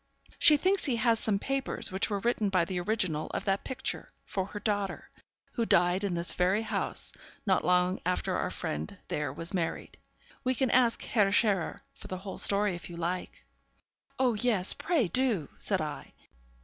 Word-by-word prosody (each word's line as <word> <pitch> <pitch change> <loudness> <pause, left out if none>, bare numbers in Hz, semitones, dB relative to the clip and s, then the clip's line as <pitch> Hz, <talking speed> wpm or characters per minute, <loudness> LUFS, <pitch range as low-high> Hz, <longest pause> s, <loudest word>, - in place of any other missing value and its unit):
She 305 -3 +8
thinks 380 +5 +1
he 260 - +1
has 230 -1 +2
some 210 -2 +1
papers 270 +1 -2
which 190 +4 0
were 205 - -1
written 215 -1 0
by 185 -3 +2
the 185 0 -3
original 175 -5 -1
of - - -3
that 195 -1 0
picture 260 0 -4 0.2
for 190 -1 -3
her 205 - -7
daughter, 205 -3 -2 0.4
who 235 - -1
died 180 -2 +3
in 195 -3 -1
this 170 0 +1
very 185 +5 +1
house 220 - +2 0.3
not 190 -3 +2
long 180 +1 +2
after 180 +1 -1
our - - -1
friend 75 +1 -5
there 150 -3 -2
was 165 +6 -3
married. 170 -3 -3 0.5
We 255 0 +1
can 260 -1 +1
ask 245 -2 +3
Herr 205 -5 +2
Scherer 205 -4 +1
for - - -11
the 185 - -4
whole 190 +1 -7
story 200 -1 +3
if 175 0 -7
you 170 - -8
like.' 175 +2 -4 0.7
'Oh 255 -2 +2
yes, 215 -4 +2
pray 320 - 0
do!' 215 - +1
said - - +1
I. - - -6
200 Hz, 180 wpm, -29 LUFS, 180-230 Hz, 0.7 s, She